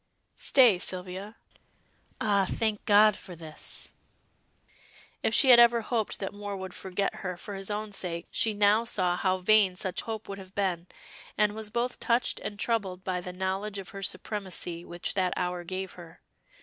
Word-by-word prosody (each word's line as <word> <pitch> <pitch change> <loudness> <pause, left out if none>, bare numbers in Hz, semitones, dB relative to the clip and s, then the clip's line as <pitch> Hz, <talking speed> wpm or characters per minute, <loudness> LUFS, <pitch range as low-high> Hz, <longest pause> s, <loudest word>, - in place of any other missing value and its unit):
"Stay, 240 -9 +5
Sylvia. 185 +3 -3 0.8
Ah, 200 -3 +2
thank 220 -2 0
God 210 0 +6
for 180 -2 -9
this!" 160 -2 -5 1.3
If - - +1
she 265 -4 +7
had 240 - +9
ever 235 0 +6
hoped 225 -1 -2
that 195 0 -5
Moor 205 0 -5
would 190 -1 -7
forget 190 +1 -2
her 180 -2 -4
for 205 - -8
his 195 0 -4
own 210 0 -3
sake, 175 -3 -2
she 225 - +2
now 205 +2 +4
saw 185 -6 0
how 185 0 +1
vain 190 0 +4
such 185 -1 -1
hope 220 -1 -5
would 200 0 -6
have 190 0 -13
been, 185 -4 -1 0.5
and 210 -1 +3
was 220 -1 -6
both 240 +3 -2
touched 235 +1 +1
and 205 - -6
troubled 200 -5 -1
by 180 -1 -2
the 180 - -6
knowledge 190 +3 -3
of 195 -1 -7
her 195 - -8
supremacy 185 -4 -3
which 175 0 -3
that 185 -2 +1
hour 180 0 -2
gave 185 +2 -5
her. 170 -1 -13
195 Hz, 175 wpm, -28 LUFS, 180-215 Hz, 1.3 s, had